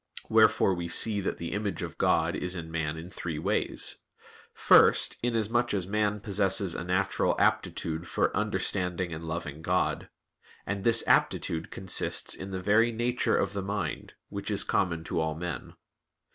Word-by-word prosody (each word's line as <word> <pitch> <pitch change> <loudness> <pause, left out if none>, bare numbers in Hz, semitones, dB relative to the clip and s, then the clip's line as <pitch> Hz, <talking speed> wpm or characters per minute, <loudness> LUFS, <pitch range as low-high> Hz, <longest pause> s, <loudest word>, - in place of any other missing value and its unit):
Wherefore 95 - +4
we 85 -1 -4
see 100 +4 +3
that 95 - -3
the 85 - -5
image 100 -4 -3
of - - -7
God - - +2
is 90 +1 -2
in 80 -2 -7
man 80 -1 -2
in 85 +3 -9
three 85 -4 -5
ways. - - 0 0.5
First, - - +5
inasmuch 120 -1 0
as 95 -3 -1
man 105 +1 -1
possesses 100 -2 0
a - - -4
natural 95 +2 0
aptitude 80 +1 0
for - - 0
understanding 90 -2 -1
and 80 +1 -7
loving 80 -2 -5
God; 90 +2 -1 0.6
and 100 0 -3
this 115 -1 +4
aptitude 80 0 +1
consists 95 -1 0
in 95 - -6
the 95 -1 -4
very 115 +4 +4
nature 120 +2 0
of 100 - -1
the 100 - -3
mind, 95 -5 -4
which 100 0 -5
is 105 - +2
common 85 -3 0
to 80 - -2
all 80 -1 -1
men. 85 -4 -6
95 Hz, 160 wpm, -28 LUFS, 85-105 Hz, 0.6 s, First